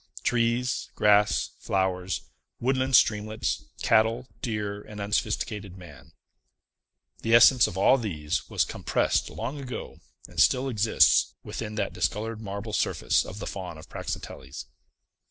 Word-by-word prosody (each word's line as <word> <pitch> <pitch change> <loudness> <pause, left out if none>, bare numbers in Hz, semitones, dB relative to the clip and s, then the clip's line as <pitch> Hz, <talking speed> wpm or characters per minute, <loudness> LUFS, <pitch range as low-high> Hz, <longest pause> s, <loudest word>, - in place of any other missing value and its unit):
Trees, 120 +2 0
grass, 105 0 +3
flowers, 95 -1 -1 0.4
woodland 130 +1 +1
streamlets, 110 0 +2 0.2
cattle, 115 +3 +3
deer, 105 -3 -3
and 105 0 -10
unsophisticated 105 -1 -2
man. 90 -2 -14 1.1
The 115 +1 +3
essence 120 +1 +7
of 90 - -7
all 130 +7 +5
these 80 -10 -3
was - - +1
compressed - - 0
long 130 +6 -5
ago, 130 -3 -7 0.3
and - - -8
still 130 +1 +4
exists, 110 -2 +3
within 105 -1 -6
that 100 -2 -2
discolored 110 +1 -2
marble 100 +1 -6
surface - - +1
of 90 - -9
the 105 - -6
Faun 90 -4 -6
of 80 - -13
Praxiteles. 70 +2 -7
105 Hz, 125 wpm, -27 LUFS, 100-115 Hz, 1.1 s, essence